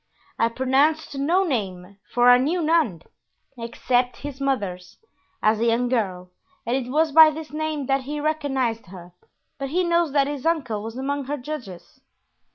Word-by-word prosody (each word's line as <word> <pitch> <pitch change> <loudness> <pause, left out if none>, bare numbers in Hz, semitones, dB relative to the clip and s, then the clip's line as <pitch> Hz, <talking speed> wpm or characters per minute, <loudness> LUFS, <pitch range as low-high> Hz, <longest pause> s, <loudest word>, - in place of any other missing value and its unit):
"I 230 - +3
pronounced 275 +6 +1
no 330 +8 +2
name, 200 - -4
for 245 0 +3
I 245 - +7
knew 325 +7 0
none, 305 - +1 0.5
except 245 +1 -1
his 280 -1 -7
mother's, 195 -9 -3 0.5
as 215 0 +3
a 230 - +1
young 240 +2 +1
girl, 185 -7 -2 0.3
and 240 +2 0
it 255 -2 -3
was 310 +3 +2
by 315 +1 +9
this 310 0 -7
name 310 -2 -2
that 270 +1 +1
he 295 +2 -4
recognized 270 -8 -1
her, 175 -1 -12 0.5
but 275 -1 -3
he 360 +5 +1
knows 340 -3 +1
that 280 -2 +3
his 285 -2 -5
uncle 275 -11 0
was 225 +3 -7
among 280 +1 -2
her 290 +3 -3
judges." 250 - -8
265 Hz, 165 wpm, -23 LUFS, 230-305 Hz, 0.5 s, by